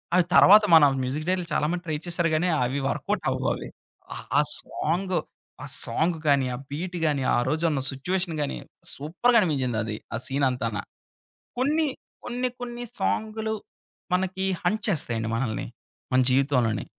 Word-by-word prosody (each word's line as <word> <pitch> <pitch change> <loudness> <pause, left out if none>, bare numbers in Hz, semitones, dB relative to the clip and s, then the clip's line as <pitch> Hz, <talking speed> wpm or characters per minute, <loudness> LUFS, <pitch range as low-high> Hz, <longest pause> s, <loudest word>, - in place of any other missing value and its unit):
ఆ - - +5 0.2
తరువాత 210 +2 +8
మన 160 -2 +9 0.2
మ్యూజిక్ 140 +5 -3
డైరెక్ట్‌ర్లు 180 -2 0
చాలా 150 - +1
మంది 180 0 -3
ట్రై 155 -2 -2
చేసారు 175 -1 0
కానీ, 170 +4 +2 0.2
అవి 130 +3 -1
వర్క‌వుటవ్వాలి. - - -1 0.5
ఆహ్, - - -8
ఆ - - +6 0.2
సాంగు 180 +3 -1 0.4
ఆ - - -5 0.2
సాంగ్ 160 +8 0
గాని, 140 -2 +4
ఆ - - -6
బీట్ 175 +4 -4
గాని, 145 -4 +1
ఆరోజున్న 155 +2 0
సిచ్యుయేషన్ 175 +5 -2
గాని, 145 - -2 0.4
సూపర్‌గా 180 - +2
అనిపించిందది. 120 - -1 0.2
ఆ - - 0
సీనంతానా. 125 -6 0 0.8
కొన్ని 300 +4 +2 0.4
కొన్ని 250 +1 -2
కొన్ని 240 0 -5 0.2
సాంగులు 220 - -1 0.6
మనకి 190 +1 0 0.2
హంట్ 215 -1 0
చేస్తాయండి 115 - -1
మనల్ని. 115 -3 -2 0.5
మన 130 - +5
జీవితంలోని. 125 -5 +1
155 Hz, 135 wpm, -25 LUFS, 130-185 Hz, 0.8 s, మన